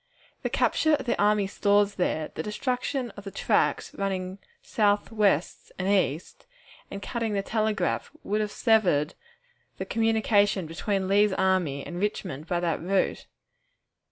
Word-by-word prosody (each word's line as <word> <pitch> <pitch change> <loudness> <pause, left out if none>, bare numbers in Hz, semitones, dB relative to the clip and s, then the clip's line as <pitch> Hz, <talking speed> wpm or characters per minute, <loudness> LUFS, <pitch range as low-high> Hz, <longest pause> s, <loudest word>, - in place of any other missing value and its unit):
The - - -2
capture 315 -1 +2
of 280 - -6
the 240 - 0
army 210 -1 +3
stores 205 +1 +2
there, 160 -5 -1
the - - -4
destruction 250 +3 -2
of 205 - -11
the 200 - -6
tracks 195 - 0
running 190 -1 -3 0.2
south, 205 -1 +1
west, 200 -7 0
and 185 - -2
east, 185 -5 0 0.4
and 200 0 -7
cutting 230 -3 -2
the 200 -1 0
telegraph, 215 0 -1
would 210 +1 0
have 210 - -1
severed 185 - +2 0.6
the - - -4
communication 220 -4 +2
between 190 +4 -2
Lee's 205 +1 +4
army 185 -8 +1
and 175 0 -6
Richmond 180 -7 -3
by 175 0 0
that 170 -3 -1
route. 190 +3 0
200 Hz, 145 wpm, -27 LUFS, 185-215 Hz, 0.6 s, Lee's